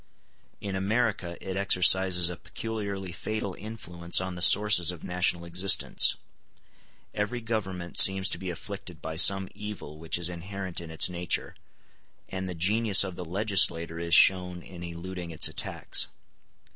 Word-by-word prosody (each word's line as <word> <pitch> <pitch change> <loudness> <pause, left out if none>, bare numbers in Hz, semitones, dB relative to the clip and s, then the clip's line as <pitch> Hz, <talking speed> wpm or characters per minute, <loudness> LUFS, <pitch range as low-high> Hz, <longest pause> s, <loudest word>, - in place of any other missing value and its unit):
In 100 -2 -5
America 100 -3 -2
it 95 - -4
exercises 95 -2 +3
a 90 - -4
peculiarly 100 -4 -6
fatal 100 +4 -5
influence 85 -6 -2
on 95 0 -5
the 90 - -9
sources 100 -3 +5
of 90 -3 -5
national 90 -1 -2
existence. 90 +3 +3 1.0
Every 105 +4 -3
government 95 -6 -3
seems 95 0 +6
to - - -2
be 95 - -6
afflicted 85 - -8
by 80 - -7
some 95 +2 +5
evil 105 -8 -9
which 80 0 -2
is 85 -1 -1
inherent 90 +1 -6
in 85 - -10
its 80 - +3
nature, 90 -1 -3 0.7
and 95 0 -6
the 90 - -6
genius 100 +4 +3
of 95 -2 -6
the 90 - -7
legislator 85 -3 0
is 85 -1 +1
shown 90 -2 +4
in 90 -2 -12
eluding 85 +1 -8
its 80 - +1
attacks. - - 0
90 Hz, 145 wpm, -27 LUFS, 85-100 Hz, 1.0 s, seems